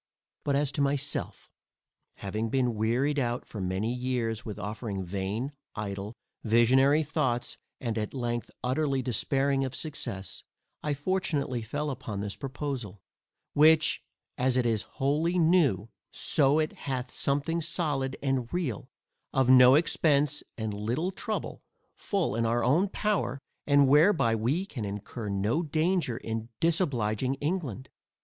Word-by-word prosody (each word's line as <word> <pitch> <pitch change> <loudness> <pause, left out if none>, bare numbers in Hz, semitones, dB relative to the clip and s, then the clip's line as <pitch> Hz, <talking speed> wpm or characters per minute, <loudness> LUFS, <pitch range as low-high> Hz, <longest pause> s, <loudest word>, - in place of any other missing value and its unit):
But, 140 - +1
as 145 0 +1
to 145 - -2
myself, 140 0 -1 0.7
having 105 +3 -3
been 125 -1 +1
wearied 120 +7 +1
out 120 -1 -1
for 105 - -7
many 95 +5 -1
years 125 -3 -2
with 105 -3 -6
offering 105 -1 -4
vain, 100 +8 -3 0.2
idle, 100 +1 -5 0.3
visionary 130 +7 +4
thoughts, 135 -5 -1 0.2
and 115 -3 -2
at 105 - -3
length 120 -3 -3
utterly 135 +1 0
despairing 135 +3 +1
of 130 -1 -3
success, 115 - -4 0.4
I 150 -1 -1
fortunately 145 -6 -1
fell 145 +7 -3
upon 110 -6 -5
this 100 0 -4
proposal, 135 -7 -5 0.5
which, 155 +1 +5 0.4
as 130 0 +2
it 125 - +2
is 110 -3 +2 0.2
wholly 155 +6 +1
new, 160 - +3 0.2
so 140 0 +3
it 155 -1 0 0.2
hath 130 -1 -3
something 145 +4 0
solid 150 -5 -1
and 135 -3 0
real, 160 - -3 0.4
of 130 -1 +4
no 125 0 +8
expence 150 -2 +2 0.2
and 110 -2 -3
little 120 - -1
trouble, 215 +3 -4 0.3
full 195 - -1
in 115 - +1
our 115 +1 +1
own 165 +10 +3
power, 210 -9 0 0.3
and 145 -1 +5
whereby 150 - +5
we 125 - 0
can 125 - -6
incur 105 +2 -5
no 100 +10 +1
danger 160 -4 0
in 115 -2 -4
disobliging 130 - +1
England. 140 - -3
130 Hz, 135 wpm, -29 LUFS, 115-150 Hz, 0.7 s, no